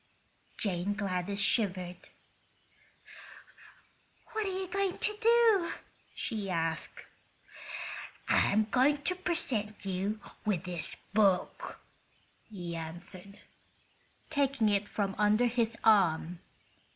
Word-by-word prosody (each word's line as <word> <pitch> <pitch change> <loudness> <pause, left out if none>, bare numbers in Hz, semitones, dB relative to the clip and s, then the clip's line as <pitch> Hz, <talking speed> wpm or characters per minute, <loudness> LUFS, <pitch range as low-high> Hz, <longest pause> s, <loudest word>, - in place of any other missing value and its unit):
Jane 195 -1 -1
Gladys 200 -1 -2
shivered. 185 -5 0 2.2
"What 435 -2 -1
are 380 0 -2
you 380 - -3
going 390 0 0
to 425 - +1
do?" 455 -6 +5 0.4
she 210 -5 -3
asked. 165 -2 -2 1.2
"I'm 215 +2 +4
going 285 +3 +3
to 365 - +1
present 260 - -1
you 195 +3 -1 0.2
with 195 -5 0
this 175 -3 -4 0.2
book," 200 -4 +2 0.7
he 175 -5 -5
answered, 175 +4 -7 0.9
taking 275 -6 +2
it 205 0 +1
from 200 -2 -1
under 210 +3 +4
his 230 -1 +1
arm. 175 -5 +4
210 Hz, 95 wpm, -31 LUFS, 185-275 Hz, 2.2 s, do